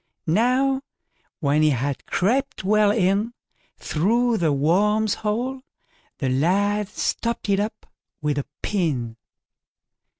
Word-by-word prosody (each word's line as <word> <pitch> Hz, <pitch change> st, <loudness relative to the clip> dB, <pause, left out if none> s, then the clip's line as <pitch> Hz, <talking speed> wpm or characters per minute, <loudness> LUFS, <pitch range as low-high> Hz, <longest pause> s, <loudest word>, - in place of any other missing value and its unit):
Now, 255 Hz, +9 st, +2 dB, 0.6 s
when 145 Hz, 0 st, +2 dB
he 155 Hz, -, +5 dB
had 140 Hz, 0 st, -2 dB
crept 260 Hz, +8 st, 0 dB
well 210 Hz, +1 st, +4 dB
in 205 Hz, +3 st, +1 dB, 0.4 s
through 230 Hz, +8 st, +1 dB
the 165 Hz, -3 st, +2 dB
worm's 200 Hz, +9 st, +2 dB
hole, 245 Hz, +5 st, -2 dB, 0.6 s
the 135 Hz, -, -2 dB
lad 195 Hz, +9 st, +1 dB
stopped 230 Hz, +2 st, -2 dB
it 195 Hz, 0 st, +3 dB
up 215 Hz, +1 st, -4 dB, 0.3 s
with 150 Hz, -2 st, -1 dB
a 140 Hz, -, -4 dB, 0.2 s
pin. 135 Hz, -, -1 dB
205 Hz, 110 wpm, -23 LUFS, 155-225 Hz, 0.6 s, he